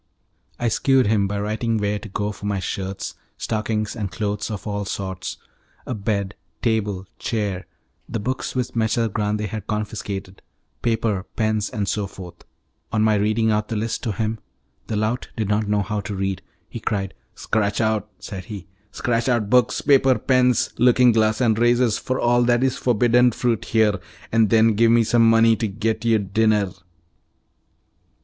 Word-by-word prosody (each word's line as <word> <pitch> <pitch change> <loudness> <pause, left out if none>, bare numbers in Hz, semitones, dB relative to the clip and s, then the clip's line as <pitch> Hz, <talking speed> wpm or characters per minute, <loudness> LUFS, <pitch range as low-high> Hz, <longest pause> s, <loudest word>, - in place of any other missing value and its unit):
I 120 - -1
shewed 130 +3 +3
him 105 -2 +2
by 100 +1 -3
writing 110 +2 -1
where 105 0 -1
to 105 - -10
go 105 +2 -2
for 105 0 -7
my 100 -1 0
shirts, 95 +1 -4 0.2
stockings, 110 -1 -2
and 105 -5 -4
clothes 105 +2 -2
of 105 -4 -6
all 100 -1 -2
sorts, 95 -2 -5 0.5
a - - -3
bed, 100 -2 -2 0.3
table, 105 -5 0
chair, 100 -5 -2 0.4
the 115 - -2
books 130 +6 -3
which 125 -1 -2
Messer 115 +1 +1
Grande 105 0 -1
had 105 0 -5
confiscated, 105 -3 -4 0.4
paper, 110 -4 0
pens, 110 -1 0
and 100 -2 -3
so 100 +1 -1
forth. 90 -3 -11 0.5
On 110 -1 +2
my 110 0 +4
reading 110 +2 +2
out 105 0 0
the 115 - -3
list 110 +2 -2
to 115 - -2
him 110 +2 -2 0.5
(the 110 - -2
lout 110 +4 -1
did 110 -3 -1
not 105 0 +1
know 105 0 +1
how 105 +2 -2
to 100 +1 -5
read) 95 -1 -2 0.3
he - - -7
cried, 95 -3 -2 0.2
"Scratch 100 -2 -1
out," 110 -2 0
said 95 -3 -7
he, 100 -3 -8 0.3
"scratch 120 +1 0
out 115 -4 0
books, 125 -1 +3
paper, 135 -2 +4
pens, 125 -2 +2
looking 125 0 +5
glass 110 -1 +2
and 115 -4 +2
razors, 120 -1 +3
for 130 - -2
all 120 0 +3
that 120 +1 +3
is 130 -1 +1
forbidden 120 +1 +3
fruit 120 -2 0
here, 110 -3 +2 0.3
and 115 -2 +3
then 115 0 +5
give 115 +2 +4
me 115 0 +5
some 115 0 +4
money 115 0 +5
to 115 - -1
get 110 +2 -2
your 115 -1 +4
dinner." 105 0 +1
110 Hz, 170 wpm, -22 LUFS, 100-115 Hz, 0.5 s, looking